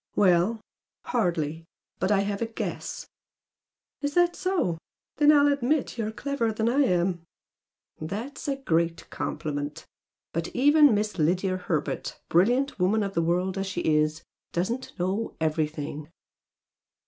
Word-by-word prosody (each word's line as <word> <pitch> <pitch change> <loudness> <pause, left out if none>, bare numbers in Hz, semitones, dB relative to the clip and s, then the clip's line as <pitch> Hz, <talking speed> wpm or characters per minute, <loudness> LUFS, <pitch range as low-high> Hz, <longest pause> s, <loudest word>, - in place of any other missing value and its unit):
"Well, 195 +3 +3 0.4
hardly! 165 -8 -1 0.3
But 190 - 0
I 200 -1 +4
have 200 +1 -2
a 230 - 0
guess!" 225 - -5 1.0
"Is 285 0 -2
that 350 0 +4
so? 350 - 0 0.4
Then 295 +1 +6
I'll 290 -1 +6
admit 280 +1 +1
you're 220 -2 -2
cleverer 235 -1 -1
than 220 +1 -1
I 250 +4 +2
am!" 175 -4 +1 0.8
"Thats 220 - -5
a 280 - +1
great 170 -10 0
compliment! 145 -1 -4 0.5
But 165 +1 -1
even 290 -1 +6
Miss 210 -2 -2
Lydia 185 +4 +1
Herbert, 170 -5 -3
brilliant 245 - +2
woman 205 +4 +2
of 195 -1 -3
the 170 - +1
world 180 +3 0
as 195 - -2
she 190 -2 -3
is, 155 0 +1 0.3
doesn't 230 +9 -3
know 190 +5 -2
EVERYTHING!" 155 -1 -2
195 Hz, 135 wpm, -27 LUFS, 165-245 Hz, 1.0 s, Then